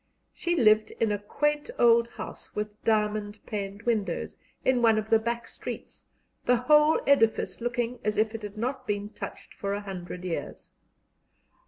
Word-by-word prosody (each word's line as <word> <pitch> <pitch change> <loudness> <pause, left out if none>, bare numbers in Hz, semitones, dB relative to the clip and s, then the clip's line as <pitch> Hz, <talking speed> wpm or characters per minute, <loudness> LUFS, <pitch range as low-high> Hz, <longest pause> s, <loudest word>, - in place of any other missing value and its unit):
She 345 0 -1
lived 215 -6 +5
in 225 -2 +2
a 205 - 0
quaint 295 - -1
old 235 0 +5
house - - -9
with 210 0 -4
diamond 210 -1 +1
paned 200 0 -5
windows, 210 -7 -1 0.3
in 255 -2 +3
one 225 -2 +5
of 215 0 -3
the 225 - +6
back 235 +1 -3
streets, - - -8 0.4
the 250 - +5
whole 300 +5 +5
edifice 230 -5 +3
looking 240 0 -1
as 210 0 0
if 220 +1 +2
it 225 - -5
had 210 0 -7
not 255 +3 -3
been 205 0 -2
touched - - -8
for 200 0 -3
a 205 - -4
hundred 180 -2 -7
years. 170 -3 -5
220 Hz, 165 wpm, -28 LUFS, 205-240 Hz, 0.4 s, the